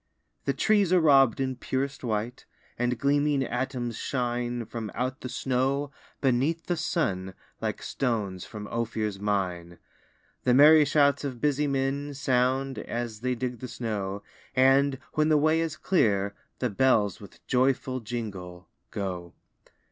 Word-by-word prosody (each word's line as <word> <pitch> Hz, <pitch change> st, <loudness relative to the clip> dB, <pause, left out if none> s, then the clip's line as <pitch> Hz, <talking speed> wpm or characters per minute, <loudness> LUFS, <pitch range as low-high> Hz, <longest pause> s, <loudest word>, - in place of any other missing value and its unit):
The -, -, +1 dB
trees 205 Hz, -4 st, +2 dB
are 185 Hz, -, +6 dB
rob'd 135 Hz, -7 st, +5 dB
in 130 Hz, -1 st, -1 dB
purest 135 Hz, +3 st, -3 dB
white, 115 Hz, +1 st, -3 dB, 0.3 s
And 125 Hz, 0 st, 0 dB
gleaming 145 Hz, +1 st, +2 dB
atoms 125 Hz, -2 st, -3 dB
shine 120 Hz, -2 st, -2 dB
From 110 Hz, -1 st, -5 dB
out 130 Hz, +1 st, -2 dB
the 125 Hz, -, -5 dB
snow, 135 Hz, +3 st, 0 dB, 0.3 s
beneath 140 Hz, +6 st, +1 dB
the 175 Hz, -, 0 dB
sun, 95 Hz, -, -1 dB, 0.3 s
Like -, -, -3 dB
stones 105 Hz, -8 st, -2 dB
from 105 Hz, -1 st, -8 dB
Ophir's 110 Hz, -3 st, -2 dB
mine. 90 Hz, -4 st, -2 dB, 0.7 s
The 125 Hz, -, +4 dB
merry 150 Hz, +2 st, +8 dB
shouts 140 Hz, 0 st, +3 dB
of 130 Hz, -4 st, -4 dB
busy 150 Hz, +1 st, +1 dB
men 140 Hz, +1 st, -1 dB
Sound, 130 Hz, 0 st, +1 dB
as 120 Hz, -3 st, -4 dB
they 125 Hz, +2 st, -1 dB
dig 125 Hz, 0 st, -4 dB
the 125 Hz, -, -6 dB
snow; 100 Hz, -5 st, -4 dB, 0.3 s
And, 135 Hz, +1 st, +4 dB, 0.2 s
when 155 Hz, 0 st, +2 dB
the 155 Hz, -, +5 dB
way 155 Hz, +2 st, +3 dB
is 160 Hz, -1 st, -3 dB
clear, 100 Hz, -, +1 dB, 0.2 s
the 125 Hz, -3 st, -1 dB
bells 105 Hz, -4 st, +2 dB
With 100 Hz, -, -14 dB
joyful 130 Hz, 0 st, +1 dB
jingle, 100 Hz, -6 st, -6 dB, 0.2 s
go. 90 Hz, -4 st, -5 dB
125 Hz, 140 wpm, -27 LUFS, 110-140 Hz, 0.7 s, merry